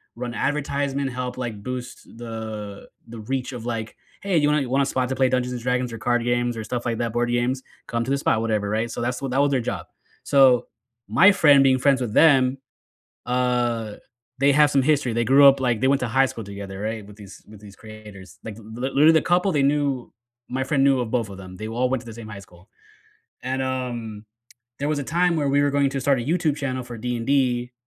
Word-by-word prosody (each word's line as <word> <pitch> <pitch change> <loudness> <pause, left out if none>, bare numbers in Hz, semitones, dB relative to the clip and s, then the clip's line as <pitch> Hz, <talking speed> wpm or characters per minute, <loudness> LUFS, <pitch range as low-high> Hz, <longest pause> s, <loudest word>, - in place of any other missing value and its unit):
run 120 0 -5
advertisement, 140 -2 -1
help, 125 0 -4
like, 115 -5 -5
boost 125 -1 -7
the 110 -3 -7 0.2
the 115 -1 -9
reach 130 +3 -3
of, 120 -1 -7
like, 115 -2 -4 0.3
"Hey, 195 -4 0
you 145 -1 +3
want 150 0 +2
a - - -1
you 125 - -4
want 135 +2 +2
a - - 0
spot 130 -1 -1
to 130 - -2
play 130 -1 +2
Dungeons& 125 -1 -1
Dragons, 125 -1 -1
or 115 - -6
card 120 +1 0
games, 120 0 0
or 110 - -4
stuff 120 +3 -4
like 115 -1 -2
that, 115 -2 -1
board 120 0 0
games? 125 +2 -1 0.2
Come 115 0 -1
to 135 - -3
this 140 - +1
spot," 110 - +1
whatever, 105 -3 -1
right? 110 +2 -1
So, - - -5
that's 125 +1 -2
what 135 -2 -4
that 135 +2 +2
was 145 - +3
their 130 -3 +1
job. - - -5 0.4
So, 135 -3 +4 0.4
my 190 +3 +6
friend 145 -7 +5
being 130 -1 +3
friends 135 -1 +2
with 115 -3 -3
them, 135 -4 +4 0.7
uh, 120 -3 0 0.4
they 140 +1 +4
have 150 0 +4
some 135 -2 +2
history, 145 -4 +1
they 115 0 0
grew 140 +4 +6
up, 135 0 +4
like 120 -4 0
they 130 - +2
went 140 0 +2
to 125 - -1
high 135 +3 +3
school 120 -4 -7
together, 100 -1 -8
right, 110 0 -4
with 105 0 -14
these 100 -2 -13
with 105 -1 -13
these 100 -2 -13
creators, 105 -3 -13
like, 110 -2 -6
the 115 - -13
l 110 +3 -10
literally, 150 +3 +6
the 160 - +4
couple 180 +2 +2
they 145 -2 +1
knew, 140 -3 0 0.4
my 130 +1 -2
friend 135 0 +1
knew 135 -2 +3
of 115 -2 -3
both 115 -4 -1
of 100 - -9
them, 95 -1 -10
they 110 - -6
all 125 +3 0
went 130 -3 0
to - - -17
the 115 - -9
same 115 -2 -10
high 105 -2 -8
school. 90 0 -19 0.8
And, 130 +1 -2
um, 120 -5 -4 0.5
there 145 - -2
was 150 -1 0
a 140 - -3
time 175 +2 +1
where 145 -2 0
we 140 +1 +3
were 145 - +2
going 140 -1 +1
to 135 - -3
start 135 -1 +2
a - - -3
YouTube 155 +2 0
channel 130 -3 -3
for 120 -1 -8
D&D 125 +1 0
125 Hz, 240 wpm, -23 LUFS, 115-135 Hz, 0.8 s, my